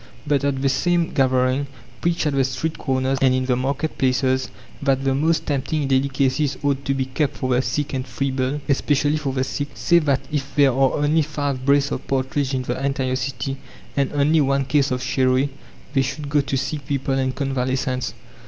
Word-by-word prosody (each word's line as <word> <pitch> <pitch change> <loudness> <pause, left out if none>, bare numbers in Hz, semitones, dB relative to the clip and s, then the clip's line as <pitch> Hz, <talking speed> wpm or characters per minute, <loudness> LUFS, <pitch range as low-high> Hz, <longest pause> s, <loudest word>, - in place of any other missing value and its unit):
But 145 -2 +2
say 140 - +1
at 135 -1 -1
the - - +3
same 170 +5 +1
gathering, 130 +1 +2 0.3
preach 170 -1 0
at 150 - +1
the 135 -1 +3
street 135 +5 -3
corners 130 0 0
and 130 -1 +4
in 130 0 0
the 125 -1 +2
market 140 +5 -2
places, 130 0 +1 0.3
that 135 -2 +1
the 135 -1 +2
most 160 +4 +1
tempting 145 +1 -1
delicacies 135 +1 +1
ought 140 -1 0
to 135 - +1
be 135 -1 0
kept 130 +2 -1
for 130 -1 0
the 125 - +3
sick 145 +2 -2
and 130 -1 -3
feeble 135 +2 -1
especially 145 +1 +2
for 145 -3 -2
the 130 0 0
sick. 145 +2 -3
Say 170 -1 +4
that 140 -4 +1
if 140 -2 -3
there 140 -2 +5
are 135 +1 +2
only 150 +2 +2
five 145 -3 -2
brace 140 0 +3
of - - -4
partridge 135 +1 0
in 130 - -1
the 125 +2 -3
entire 135 -2 0
city, 130 0 -3 0.4
and 140 -1 +1
only 150 +2 +3
one 140 0 +1
case 140 0 +2
of 125 -1 -2
sherry, 130 +1 +2 0.4
they 135 - +3
should 140 +2 -3
go 145 0 +3
to 140 -1 -2
sick 140 +1 -3
people 135 -1 -1
and 130 -1 0
convalescents. 130 -2 -1
135 Hz, 200 wpm, -22 LUFS, 130-145 Hz, 0.4 s, there